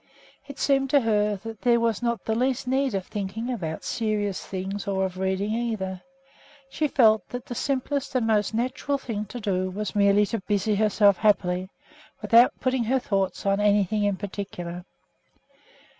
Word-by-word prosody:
It 280 Hz, -1 st, -9 dB
seemed 270 Hz, -1 st, +2 dB
to 285 Hz, +1 st, +4 dB
her 210 Hz, -2 st, +1 dB
that 225 Hz, -2 st, -8 dB
there 240 Hz, -1 st, +3 dB
was 230 Hz, -2 st, 0 dB
not 235 Hz, -1 st, -2 dB
the 220 Hz, -, 0 dB
least 255 Hz, +2 st, 0 dB
need 265 Hz, -2 st, +1 dB
of 190 Hz, -1 st, -2 dB
thinking 215 Hz, +4 st, -4 dB
about 160 Hz, -8 st, -5 dB
serious 210 Hz, -3 st, -2 dB
things 195 Hz, +2 st, -5 dB
or 190 Hz, -1 st, 0 dB
of 185 Hz, 0 st, -6 dB
reading, 190 Hz, +2 st, -1 dB
either. 215 Hz, -6 st, -3 dB, 0.7 s
She 305 Hz, -, 0 dB
felt 220 Hz, -6 st, +3 dB
that 245 Hz, +1 st, -6 dB
the 255 Hz, -, -6 dB
simplest 275 Hz, +2 st, -2 dB
and 245 Hz, -3 st, +2 dB
most 215 Hz, -2 st, +2 dB
natural 255 Hz, +5 st, -1 dB
thing 220 Hz, -6 st, -4 dB
to 245 Hz, +4 st, -8 dB
do 185 Hz, -3 st, -1 dB
was 205 Hz, +2 st, -4 dB
merely 200 Hz, 0 st, +4 dB
to 220 Hz, +1 st, -3 dB
busy 210 Hz, +1 st, +1 dB
herself 205 Hz, -2 st, +3 dB
happily, 185 Hz, -3 st, +1 dB, 0.5 s
without 235 Hz, +2 st, +4 dB
putting 255 Hz, -2 st, 0 dB
her 260 Hz, +4 st, +2 dB
thoughts 195 Hz, -7 st, -1 dB
on 195 Hz, 0 st, +2 dB
anything 205 Hz, 0 st, +2 dB
in 205 Hz, -2 st, +1 dB
particular. 180 Hz, -3 st, -6 dB
210 Hz, 170 wpm, -25 LUFS, 195-240 Hz, 0.7 s, to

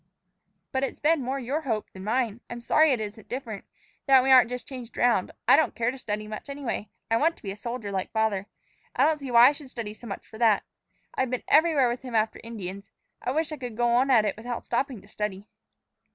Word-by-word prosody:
"But 265 Hz, 0 st, 0 dB
it's 270 Hz, -, -3 dB
been 315 Hz, 0 st, +3 dB
more 260 Hz, +2 st, -2 dB
your 270 Hz, +5 st, -2 dB
hope 225 Hz, -8 st, -3 dB
than 190 Hz, -, -10 dB
mine. 230 Hz, +1 st, -1 dB
I'm 240 Hz, -, -6 dB
sorry 310 Hz, +5 st, +4 dB
it 250 Hz, -, +1 dB
isn't 215 Hz, 0 st, -7 dB
different 235 Hz, -6 st, -5 dB, 0.4 s
that 265 Hz, -2 st, +7 dB
we 265 Hz, -, +3 dB
aren't 250 Hz, -3 st, +7 dB
just 250 Hz, -1 st, -5 dB
changed 250 Hz, -3 st, -9 dB
around. 235 Hz, -6 st, +3 dB, 0.2 s
I -, -, +8 dB
don't 315 Hz, -, +2 dB
care 235 Hz, +1 st, +1 dB
to 265 Hz, -, -9 dB
study 210 Hz, -3 st, -4 dB
much, 215 Hz, +6 st, -7 dB
anyway. 275 Hz, -7 st, -4 dB, 0.2 s
I 225 Hz, -, +4 dB
want 325 Hz, +6 st, +2 dB
to -, -, -20 dB
be 195 Hz, -, -4 dB
a -, -, -6 dB
soldier, 225 Hz, -1 st, -5 dB
like 190 Hz, -1 st, -3 dB
father. 215 Hz, -3 st, 0 dB, 0.5 s
I -, -, +4 dB
don't 310 Hz, -1 st, +2 dB
see 275 Hz, -2 st, -6 dB
why 240 Hz, +1 st, +8 dB
I -, -, +1 dB
should 290 Hz, -2 st, -10 dB
study 230 Hz, -5 st, -6 dB
so 235 Hz, +2 st, -12 dB
much 195 Hz, -, -6 dB
for 220 Hz, -, -13 dB
that. 225 Hz, -4 st, +4 dB, 0.5 s
I've 260 Hz, -, 0 dB
been 255 Hz, 0 st, -3 dB
everywhere 305 Hz, -4 st, +5 dB
with 240 Hz, +1 st, -2 dB
him 250 Hz, -3 st, -6 dB
after 220 Hz, 0 st, +1 dB
Indians. 200 Hz, -4 st, -7 dB, 0.3 s
I -, -, -2 dB
wish 315 Hz, +4 st, 0 dB
I 305 Hz, -, -4 dB
could 245 Hz, -5 st, -7 dB
go 240 Hz, 0 st, +2 dB
on 250 Hz, +3 st, +3 dB
at 225 Hz, -5 st, +5 dB
it 205 Hz, -, -1 dB
without 235 Hz, +2 st, -6 dB
stopping 245 Hz, -2 st, -2 dB
to -, -, -18 dB
study." 210 Hz, -2 st, -4 dB
240 Hz, 240 wpm, -27 LUFS, 215-265 Hz, 0.5 s, I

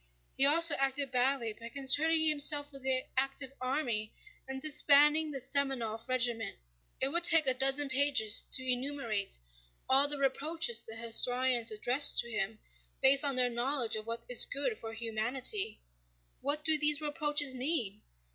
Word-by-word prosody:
He 275 Hz, -, +2 dB
also 335 Hz, +3 st, +4 dB
acted 275 Hz, 0 st, -3 dB
badly 250 Hz, -2 st, -2 dB
by 230 Hz, +2 st, -12 dB
concerning 305 Hz, +5 st, +2 dB
himself 290 Hz, -1 st, +3 dB
with 275 Hz, -, -11 dB
the 260 Hz, 0 st, -2 dB
active 270 Hz, 0 st, -3 dB
army 250 Hz, -5 st, -4 dB, 0.4 s
and 265 Hz, 0 st, -7 dB
disbanding 300 Hz, +1 st, +2 dB
the 285 Hz, -, -6 dB
Semënov 260 Hz, -4 st, -4 dB
regiment." 240 Hz, -3 st, -2 dB, 0.4 s
It 265 Hz, -, +1 dB
would 340 Hz, +4 st, +1 dB
take 325 Hz, -3 st, +5 dB
a 260 Hz, -, +4 dB
dozen 270 Hz, +2 st, +3 dB
pages 260 Hz, -5 st, +1 dB
to 260 Hz, -, -1 dB
enumerate 250 Hz, -5 st, -3 dB, 0.5 s
all 275 Hz, +2 st, +4 dB
the 290 Hz, 0 st, 0 dB
reproaches 275 Hz, -2 st, -1 dB
the 225 Hz, -1 st, -7 dB
historians 240 Hz, +1 st, +1 dB
address 250 Hz, +7 st, +4 dB
to 235 Hz, -, -3 dB
him, 215 Hz, 0 st, -4 dB, 0.4 s
based 270 Hz, +1 st, +4 dB
on 280 Hz, -2 st, 0 dB
their 250 Hz, -1 st, +2 dB
knowledge 240 Hz, 0 st, 0 dB
of 215 Hz, 0 st, -7 dB
what 230 Hz, 0 st, -5 dB
is 245 Hz, -, +5 dB
good 435 Hz, -, -3 dB
for 225 Hz, 0 st, -9 dB
humanity. 230 Hz, -, -2 dB, 0.6 s
What 290 Hz, +2 st, -2 dB
do 315 Hz, 0 st, +3 dB
these 300 Hz, -1 st, +2 dB
reproaches 295 Hz, -2 st, -2 dB
mean? 250 Hz, -7 st, -4 dB
265 Hz, 155 wpm, -29 LUFS, 235-290 Hz, 0.6 s, take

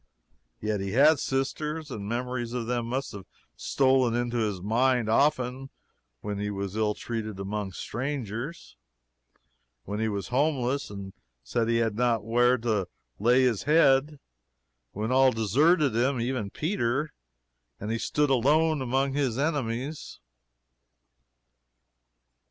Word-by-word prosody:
yet 105 Hz, -1 st, -1 dB
he 95 Hz, 0 st, -3 dB
had 145 Hz, +4 st, +5 dB
sisters; 150 Hz, +3 st, -2 dB
and 100 Hz, -3 st, -5 dB
memories 120 Hz, 0 st, -3 dB
of 125 Hz, -2 st, -2 dB
them 120 Hz, 0 st, -2 dB
must 130 Hz, +3 st, -3 dB
have 100 Hz, -2 st, -10 dB, 0.3 s
stolen 130 Hz, -3 st, +2 dB
into 120 Hz, 0 st, -1 dB
his 105 Hz, -5 st, -1 dB
mind 120 Hz, +4 st, +1 dB
often 130 Hz, +1 st, +1 dB, 0.5 s
when 105 Hz, -1 st, -4 dB
he 105 Hz, 0 st, -2 dB
was 100 Hz, -1 st, -4 dB
ill 105 Hz, -1 st, +1 dB
treated 110 Hz, -4 st, -5 dB
among 100 Hz, 0 st, -3 dB
strangers; 130 Hz, -, -5 dB, 1.1 s
when 105 Hz, +6 st, -4 dB
he 110 Hz, -, 0 dB
was 100 Hz, -2 st, -4 dB
homeless 135 Hz, 0 st, 0 dB
and 100 Hz, -1 st, -8 dB, 0.3 s
said 110 Hz, -, -1 dB
he 115 Hz, -, +2 dB
had 115 Hz, -2 st, +1 dB
not 115 Hz, -2 st, +1 dB
where 120 Hz, +2 st, +3 dB
to 110 Hz, -6 st, -1 dB, 0.3 s
lay 120 Hz, +5 st, +4 dB
his 120 Hz, -6 st, +1 dB
head; 145 Hz, -2 st, +4 dB, 0.7 s
when 110 Hz, +4 st, -3 dB
all 130 Hz, 0 st, +5 dB
deserted 135 Hz, -, +2 dB
him, 130 Hz, +2 st, +1 dB
even 120 Hz, -3 st, -2 dB
Peter, 150 Hz, -, -1 dB, 0.7 s
and 105 Hz, +2 st, -4 dB
he 115 Hz, -, -1 dB
stood 145 Hz, +3 st, 0 dB
alone 150 Hz, +4 st, +3 dB
among 135 Hz, +2 st, 0 dB
his 135 Hz, -5 st, 0 dB
enemies. 140 Hz, -1 st, -3 dB
120 Hz, 130 wpm, -27 LUFS, 110-135 Hz, 1.1 s, had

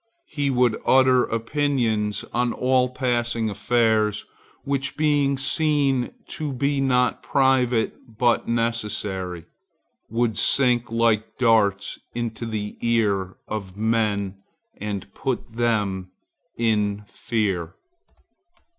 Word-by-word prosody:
He 145 Hz, -2 st, -1 dB
would 125 Hz, -3 st, +2 dB
utter 130 Hz, -1 st, +5 dB
opinions 115 Hz, -4 st, -1 dB
on 120 Hz, 0 st, +1 dB
all 125 Hz, 0 st, +2 dB
passing 120 Hz, -3 st, -1 dB
affairs, 110 Hz, -1 st, +1 dB, 0.4 s
which 140 Hz, 0 st, -2 dB
being 145 Hz, -3 st, +2 dB
seen 140 Hz, -2 st, +1 dB, 0.2 s
to 150 Hz, -2 st, -4 dB
be 140 Hz, +2 st, 0 dB
not 125 Hz, -2 st, +2 dB
private 125 Hz, -3 st, +1 dB
but 120 Hz, -1 st, +2 dB
necessary, 105 Hz, -6 st, -2 dB, 0.6 s
would 115 Hz, -2 st, 0 dB
sink 120 Hz, -3 st, +2 dB
like 115 Hz, -2 st, +1 dB
darts 110 Hz, -5 st, +2 dB, 0.2 s
into 115 Hz, -1 st, -3 dB
the 105 Hz, -2 st, -4 dB
ear 100 Hz, -5 st, +1 dB
of 100 Hz, -3 st, -5 dB
men 105 Hz, -3 st, 0 dB, 0.4 s
and 105 Hz, -2 st, -4 dB
put 130 Hz, -4 st, -3 dB
them 105 Hz, -6 st, 0 dB, 0.5 s
in 105 Hz, -3 st, +1 dB
fear. 95 Hz, -7 st, -2 dB
115 Hz, 100 wpm, -23 LUFS, 105-130 Hz, 0.6 s, utter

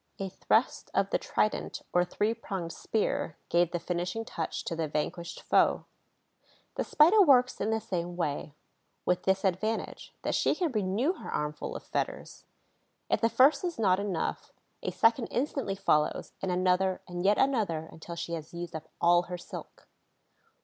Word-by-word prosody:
A 195 Hz, -1 st, -3 dB
thrust 220 Hz, +5 st, +1 dB
of 195 Hz, 0 st, +2 dB
the -, -, +2 dB
trident, 215 Hz, -, -1 dB
or 175 Hz, -, +4 dB
three 210 Hz, +5 st, 0 dB
pronged 190 Hz, -7 st, -5 dB
spear, 210 Hz, -7 st, -1 dB
gave 170 Hz, -1 st, +3 dB
the 175 Hz, -, -2 dB
finishing 180 Hz, +6 st, -3 dB
touch 165 Hz, -, -4 dB
to 165 Hz, -, -3 dB
the 160 Hz, -1 st, -1 dB
vanquished 165 Hz, +3 st, -3 dB
foe. -, -, +3 dB, 0.9 s
The -, -, -1 dB
Spider 345 Hz, +8 st, +6 dB
works 255 Hz, -7 st, +5 dB
in -, -, 0 dB
the 220 Hz, 0 st, +1 dB
same 175 Hz, -4 st, -3 dB
way, 150 Hz, -3 st, -3 dB, 0.5 s
with 180 Hz, -, +2 dB
this 190 Hz, 0 st, +2 dB
advantage, 215 Hz, +4 st, -2 dB
that -, -, -1 dB
she -, -, +2 dB
can 345 Hz, -5 st, 0 dB
renew 215 Hz, -, +1 dB
her -, -, -8 dB
armful 150 Hz, 0 st, -3 dB
of -, -, -6 dB
fetters. -, -, -4 dB, 0.7 s
If -, -, +2 dB
the 230 Hz, -, +4 dB
first 275 Hz, +6 st, +5 dB
is 350 Hz, -2 st, -2 dB
not 190 Hz, -4 st, +3 dB
enough, 200 Hz, -5 st, -2 dB, 0.3 s
a -, -, -2 dB
second 230 Hz, +1 st, +3 dB
instantly 265 Hz, -6 st, -1 dB
follows, 150 Hz, -5 st, +1 dB
and 190 Hz, -, -1 dB
another 185 Hz, +1 st, +2 dB
and 175 Hz, 0 st, -4 dB
yet 205 Hz, +2 st, +4 dB
another 205 Hz, -, +1 dB
until 170 Hz, +1 st, -8 dB
she 170 Hz, 0 st, -4 dB
has 160 Hz, 0 st, -6 dB
used 170 Hz, -1 st, -6 dB
up 160 Hz, 0 st, -7 dB
all 175 Hz, 0 st, +4 dB
her 180 Hz, -, -3 dB
silk. 175 Hz, -, -10 dB
185 Hz, 170 wpm, -29 LUFS, 170-225 Hz, 0.9 s, Spider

